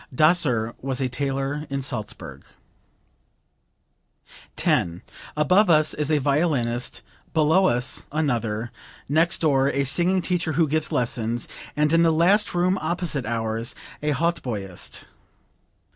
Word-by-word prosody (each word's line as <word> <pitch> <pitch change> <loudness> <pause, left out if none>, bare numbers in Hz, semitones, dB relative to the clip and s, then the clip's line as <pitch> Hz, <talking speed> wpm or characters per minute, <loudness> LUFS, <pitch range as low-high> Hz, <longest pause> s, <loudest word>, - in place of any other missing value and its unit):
Daser 130 -6 +2
was 135 -1 -2
a 130 - 0
tailor 135 +3 -3
in 140 -1 -3
Salzburg.) 120 -6 -5 2.1
10. 85 +1 0 0.3
"Above 185 +6 +4
us 155 -2 +4
is 150 -1 -2
a 155 - +3
violinist, 140 -4 -1 0.3
below 160 +5 +4
us 125 -2 0
another, 120 -7 -1 0.4
next 160 +4 +2
door 140 -4 +3
a 140 0 0
singing 175 +6 +1
teacher 175 -3 -1
who 160 +1 +2
gives 155 +1 -1
lessons, 120 -1 -1 0.3
and 150 +1 +2
in 165 - +5
the 165 - +4
last 180 +6 +3
room 180 +2 +2
opposite 160 -6 -2
ours, 115 +1 -2 0.3
a 150 - -1
hautboyist. 125 - -2
145 Hz, 120 wpm, -24 LUFS, 120-165 Hz, 2.1 s, in